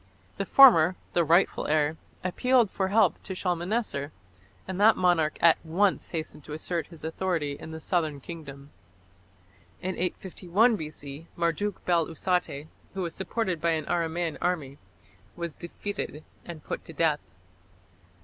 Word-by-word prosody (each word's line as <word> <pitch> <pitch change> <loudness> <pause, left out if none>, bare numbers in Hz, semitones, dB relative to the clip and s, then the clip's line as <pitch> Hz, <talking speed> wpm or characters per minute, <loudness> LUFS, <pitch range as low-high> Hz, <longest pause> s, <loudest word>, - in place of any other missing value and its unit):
The - - -2
former, 185 -11 +8 0.2
the 170 - +3
rightful 170 +4 +3
heir, 150 0 +2 0.3
appealed 235 +4 +2
for 190 - -1
help 200 -2 +3
to 190 - -6
Shalmaneser, 180 -4 -2 0.6
and 190 +1 -3
that 220 +1 +6
monarch 175 -4 +2
at 165 -1 +5
once 185 +5 +1
hastened 155 -3 -5
to 150 - -7
assert 165 +2 -3
his 165 -3 -14
authority 160 -2 -1
in 140 - -8
the 160 0 -7
southern 160 -3 -1
kingdom. 140 -2 -10 1.1
In 185 +1 -3
851 190 +5 +1
B.C. 150 -2 -8
Marduk 175 +4 -1
bel 170 -3 +2
usate, 165 -3 -1 0.3
who 190 - -2
was 170 -2 -4
supported 190 -3 -2
by 170 -1 +2
an 155 -1 -2
Aramæan 170 -1 -1
army, 150 -6 -2 0.6
was 170 -2 -4
defeated 170 -3 -6 0.2
and 165 -4 -8
put - - -5
to 165 - -10
death. 155 -1 +2
170 Hz, 140 wpm, -27 LUFS, 155-185 Hz, 1.1 s, former